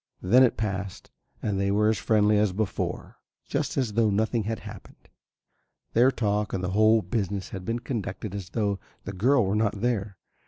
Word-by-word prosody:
Then 120 Hz, +8 st, +5 dB
it 130 Hz, -, +4 dB
passed 100 Hz, -3 st, -4 dB, 0.3 s
and 100 Hz, -3 st, -1 dB
they 100 Hz, 0 st, +1 dB
were 105 Hz, +2 st, +2 dB
as 110 Hz, -, 0 dB
friendly 105 Hz, -1 st, +3 dB
as 105 Hz, -3 st, +2 dB
before, 105 Hz, 0 st, -3 dB, 0.3 s
just -, -, -2 dB
as 125 Hz, -6 st, 0 dB
though 110 Hz, 0 st, +3 dB
nothing 110 Hz, +2 st, 0 dB
had 110 Hz, 0 st, -3 dB
happened. -, -, -12 dB, 0.8 s
Their 120 Hz, +3 st, +5 dB
talk 105 Hz, -4 st, -1 dB
and 95 Hz, -, -2 dB
the 90 Hz, -, -1 dB
whole 110 Hz, +2 st, +4 dB
business 100 Hz, 0 st, -2 dB
had 95 Hz, -1 st, -7 dB
been 115 Hz, +1 st, -1 dB
conducted 110 Hz, -5 st, -5 dB
as 100 Hz, -2 st, -6 dB
though 100 Hz, -2 st, -1 dB, 0.2 s
the 100 Hz, -, -6 dB
girl 120 Hz, +5 st, +3 dB
were 95 Hz, -, 0 dB
not 105 Hz, -1 st, 0 dB
there. 105 Hz, -5 st, -1 dB
105 Hz, 185 wpm, -26 LUFS, 100-115 Hz, 0.8 s, Then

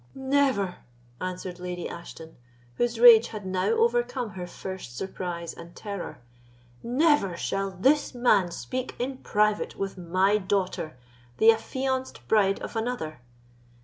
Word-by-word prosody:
"Never!" 265 Hz, -8 st, +1 dB, 0.4 s
answered 185 Hz, 0 st, -5 dB
Lady 180 Hz, -1 st, -4 dB
Ashton, 165 Hz, -1 st, -10 dB, 0.4 s
whose 240 Hz, -1 st, 0 dB
rage 235 Hz, -1 st, +9 dB
had 210 Hz, -3 st, -7 dB
now 185 Hz, 0 st, 0 dB
overcome 460 Hz, -, +1 dB
her 180 Hz, -1 st, -6 dB
first 180 Hz, -9 st, -7 dB
surprise 175 Hz, -2 st, -4 dB
and 170 Hz, +1 st, -12 dB
terror—"never 170 Hz, -, -2 dB
shall 195 Hz, +2 st, -1 dB
this 260 Hz, +10 st, +2 dB
man 215 Hz, -7 st, +3 dB
speak 255 Hz, +8 st, -5 dB
in 255 Hz, +2 st, -3 dB
private 210 Hz, 0 st, +1 dB
with 195 Hz, -1 st, -4 dB
my 185 Hz, +4 st, +2 dB
daughter, 185 Hz, -7 st, -2 dB, 0.4 s
the 225 Hz, +1 st, +7 dB
affianced 260 Hz, +3 st, -3 dB
bride 200 Hz, -3 st, +3 dB
of -, -, -6 dB
another! 220 Hz, -, -3 dB
195 Hz, 120 wpm, -27 LUFS, 180-245 Hz, 0.4 s, rage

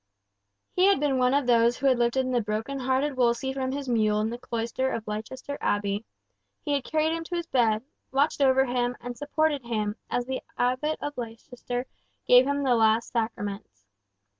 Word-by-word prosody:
He 365 Hz, -, +3 dB
had 395 Hz, -7 st, +4 dB
been 280 Hz, -3 st, +1 dB
one 250 Hz, +1 st, +3 dB
of 285 Hz, -2 st, +2 dB
those 235 Hz, 0 st, +4 dB
who 275 Hz, -, -4 dB
had 260 Hz, -3 st, +4 dB
lifted 255 Hz, +2 st, +1 dB
the 245 Hz, -1 st, +2 dB
broken 220 Hz, +6 st, -3 dB
hearted 265 Hz, +2 st, 0 dB
Wolsey 250 Hz, +1 st, +1 dB
from 260 Hz, -1 st, -2 dB
his 280 Hz, 0 st, -4 dB
mule 215 Hz, -3 st, +2 dB
in 220 Hz, +1 st, -1 dB
the 240 Hz, -, -6 dB
cloister 235 Hz, +3 st, -2 dB
of 225 Hz, -2 st, -4 dB
Leicester 255 Hz, +7 st, -5 dB
Abbey, 205 Hz, +1 st, 0 dB, 0.6 s
he 295 Hz, -, -3 dB
had 280 Hz, -2 st, 0 dB
carried 315 Hz, +3 st, +1 dB
him 330 Hz, -, -4 dB
to 350 Hz, -, -4 dB
his 340 Hz, -1 st, -2 dB
bed, 230 Hz, -7 st, +2 dB, 0.3 s
watched 280 Hz, +2 st, +1 dB
over 265 Hz, -1 st, +5 dB
him, 245 Hz, -1 st, -1 dB
and 245 Hz, 0 st, -6 dB
supported 295 Hz, 0 st, 0 dB
him, 215 Hz, -3 st, -2 dB
as 245 Hz, -, -1 dB
the 260 Hz, +1 st, -3 dB, 0.2 s
Abbot 255 Hz, +5 st, 0 dB
of 290 Hz, 0 st, -4 dB
Leicester 245 Hz, +2 st, -5 dB, 0.4 s
gave 250 Hz, +1 st, +6 dB
him 285 Hz, 0 st, 0 dB
the 260 Hz, -2 st, +3 dB
last 225 Hz, 0 st, +3 dB
Sacraments. 205 Hz, -, -4 dB
250 Hz, 190 wpm, -27 LUFS, 230-275 Hz, 0.6 s, gave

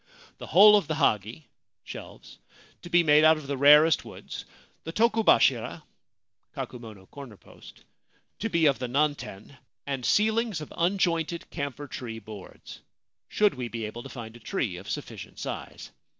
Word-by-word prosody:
The -, -, -8 dB
whole 210 Hz, +1 st, +8 dB
of 205 Hz, -, -2 dB
the 155 Hz, -, -2 dB
hagi1 115 Hz, 0 st, -4 dB, 0.4 s
to 175 Hz, -, -10 dB
be 175 Hz, 0 st, +4 dB
made 150 Hz, -1 st, +5 dB
out 160 Hz, 0 st, +6 dB
of 155 Hz, -, -9 dB
the 140 Hz, 0 st, -3 dB
rarest 150 Hz, +3 st, +6 dB
woods; -, -, -9 dB, 0.4 s
the 165 Hz, -, -6 dB
tokobashira 225 Hz, -, +2 dB, 0.7 s
2 115 Hz, +1 st, -9 dB, 1.0 s
to 225 Hz, -, -2 dB
be 170 Hz, -4 st, +2 dB
of 140 Hz, -3 st, +3 dB
the 125 Hz, -, -3 dB
nanten, 140 Hz, -4 st, -2 dB, 0.3 s
and 135 Hz, -2 st, -4 dB
ceilings 220 Hz, -, +1 dB
of 150 Hz, -, -9 dB
unjointed 170 Hz, -2 st, 0 dB
camphor 140 Hz, -1 st, -5 dB
tree 120 Hz, -5 st, -7 dB
boards, 105 Hz, -2 st, -12 dB, 0.5 s
should 210 Hz, -1 st, +2 dB
we 125 Hz, -2 st, -5 dB
be 115 Hz, -1 st, -5 dB
able 110 Hz, +3 st, -7 dB
to 135 Hz, -, -10 dB
find 115 Hz, -3 st, -9 dB
a -, -, -12 dB
tree 120 Hz, -, -3 dB
of 95 Hz, +3 st, -10 dB
sufficient -, -, -7 dB
size. -, -, -7 dB
145 Hz, 145 wpm, -27 LUFS, 120-170 Hz, 1.0 s, whole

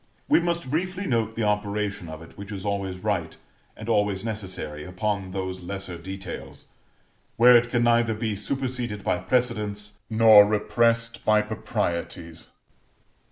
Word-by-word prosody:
We -, -, +5 dB
must 170 Hz, -5 st, -2 dB
briefly 185 Hz, +5 st, -1 dB
note 115 Hz, -6 st, 0 dB
the 115 Hz, -, -1 dB
operation 105 Hz, -3 st, -1 dB
of 80 Hz, +1 st, -8 dB
it, 80 Hz, -, -15 dB
which 100 Hz, +1 st, -9 dB
is 100 Hz, -1 st, -6 dB
always 100 Hz, -2 st, -2 dB
right, 90 Hz, -5 st, -2 dB, 0.4 s
and 110 Hz, -, -8 dB
always 105 Hz, -3 st, +1 dB
necessary, 95 Hz, -9 st, -4 dB
upon 95 Hz, +2 st, -2 dB
those 95 Hz, 0 st, -4 dB
lesser 95 Hz, 0 st, -5 dB
details, 95 Hz, +2 st, -8 dB, 0.7 s
where 125 Hz, +1 st, +8 dB
it 120 Hz, 0 st, +4 dB
can 120 Hz, -1 st, +1 dB
neither 115 Hz, -1 st, +3 dB
be 110 Hz, -1 st, -2 dB
superseded 120 Hz, -1 st, -3 dB
by 90 Hz, -, 0 dB
precedents, 105 Hz, -1 st, -1 dB
nor 110 Hz, -2 st, +8 dB
repressed 115 Hz, +3 st, +1 dB
by 105 Hz, 0 st, +4 dB
proprieties. 85 Hz, -5 st, -4 dB
105 Hz, 140 wpm, -25 LUFS, 95-115 Hz, 0.7 s, where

